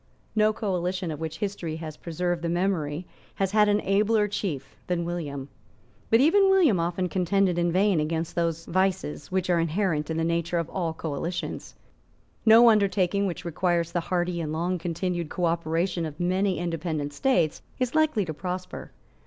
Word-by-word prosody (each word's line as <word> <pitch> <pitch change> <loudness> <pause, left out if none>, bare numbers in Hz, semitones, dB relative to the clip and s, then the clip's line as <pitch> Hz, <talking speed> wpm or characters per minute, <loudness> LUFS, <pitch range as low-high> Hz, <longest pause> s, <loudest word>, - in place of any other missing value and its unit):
No 215 0 +4
coalition 185 -4 -2
of 150 - -6
which 160 0 -4
history 190 -5 -3
has 160 -2 -7
preserved 175 +1 -2
the 170 - -2
memory 175 -3 -1 0.3
has 195 -1 0
had 210 0 +4
an 205 0 +2
abler 210 +2 +2
chief 175 -10 -4
than 175 -1 -1
William. 145 -6 -4 0.6
But 225 +2 +5
even 390 +7 +5
William 340 - +4
often 175 +2 -1
contended 185 0 +1
in 175 0 +1
vain 190 0 +3
against 160 +2 -2
those 165 -1 -1
vices 185 -5 -1
which 185 -1 0
are 170 - +3
inherent 165 -2 0
in 160 - -2
the 165 - 0
nature 170 +1 0
of 170 -1 -2
all 170 -4 -2
coalitions. 165 +3 -4 0.7
No 230 +2 +8
undertaking 200 -2 +2
which 180 -1 -5
requires 170 0 0
the 175 - 0
hearty 175 0 -1
and 155 -2 -3
long 175 +3 -1
continued 175 0 -2
cooperation 170 0 0
of 150 0 -10
many 185 +2 +1
independent 165 -4 -3
states 175 - +1 0.2
is 255 -1 -1
likely 310 -10 +2
to 160 - -4
prosper. 180 +3 -5
175 Hz, 165 wpm, -26 LUFS, 165-195 Hz, 0.7 s, No